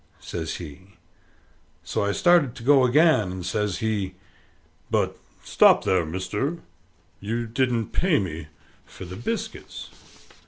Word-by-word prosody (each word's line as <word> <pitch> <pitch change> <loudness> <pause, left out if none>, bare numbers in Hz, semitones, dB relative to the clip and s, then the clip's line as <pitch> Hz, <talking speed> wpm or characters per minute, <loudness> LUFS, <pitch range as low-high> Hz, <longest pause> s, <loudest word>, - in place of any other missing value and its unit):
says 80 -2 -5
he. 90 +4 -11 0.9
So - - -2
I 100 - +1
started 165 - +3
to 115 - -10
go 135 0 +5
again, 150 - +4
and 90 -1 -6
says 105 0 -1
he, 100 -4 -2 0.7
"But - - 0 0.3
stop - - +5
there, 90 -4 +1
mister: 100 - -3 0.6
you 115 +4 -3
didn't 115 -1 0
pay 180 -5 +2
me 80 -4 -4 0.4
for - - -11
the 90 +1 -8
biscuits." 225 - -5
105 Hz, 125 wpm, -24 LUFS, 90-130 Hz, 0.9 s, go